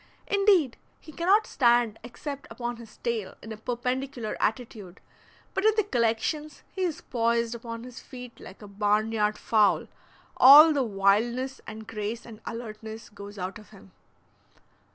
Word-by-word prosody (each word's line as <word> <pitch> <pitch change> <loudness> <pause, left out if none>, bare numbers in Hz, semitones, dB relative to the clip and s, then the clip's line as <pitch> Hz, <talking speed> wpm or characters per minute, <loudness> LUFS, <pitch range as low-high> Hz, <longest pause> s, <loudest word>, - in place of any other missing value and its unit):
Indeed, 390 - +3 0.2
he 310 - -13
cannot 380 +7 +3
stand 240 -3 +2
except 280 +4 -7
upon 240 -1 -5
his 230 -2 -13
tail 225 -5 -3
in 220 - -8
a 220 - -6
perpendicular 250 +1 -3
attitude, 215 -4 -3 0.5
but 385 - -1
in 435 0 +4
the 430 - +4
collections 275 - -1
he 380 - -6
is 345 -5 -1
poised 235 0 0
upon 230 0 -7
his 250 0 -10
feet 250 -2 -11
like 190 +3 -12
a - - -9
barn 210 +2 0
yard 210 -1 0
fowl, 215 -2 +2 0.5
all 300 +5 +10
the 285 - +1
wildness 235 +5 +1
and 220 0 -8
grace 220 +1 -5
and 225 -2 -12
alertness 220 -1 -7
goes 205 0 -11
out 190 +2 -5
of 210 - -16
him. 195 -2 -17
235 Hz, 155 wpm, -27 LUFS, 215-260 Hz, 0.5 s, all